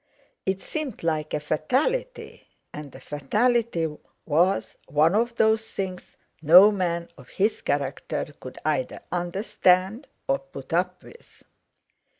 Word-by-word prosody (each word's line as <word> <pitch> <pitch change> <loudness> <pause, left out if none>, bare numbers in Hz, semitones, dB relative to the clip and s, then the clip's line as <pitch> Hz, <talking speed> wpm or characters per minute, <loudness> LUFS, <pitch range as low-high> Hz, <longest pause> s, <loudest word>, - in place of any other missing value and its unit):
It 190 -1 -1
seemed 300 - -5
like 155 -2 -1
a - - 0
fatality, 270 - -2 0.3
and 150 -3 -8
a - - -10
fatality 205 - 0 0.4
was 175 +6 +1
one 150 +4 +3
of 235 +3 +1
those 220 0 +3
things 185 -3 -6 0.2
no 180 +7 +8
man 170 -4 -2
of - - -15
his 210 +3 0
character 140 +1 -2
could 130 - -10
either 150 -5 -1
understand 185 +5 +1 0.2
or 135 - +2
put 135 +2 -10
up 180 +1 0
with. 475 - -17
180 Hz, 125 wpm, -25 LUFS, 150-215 Hz, 0.4 s, no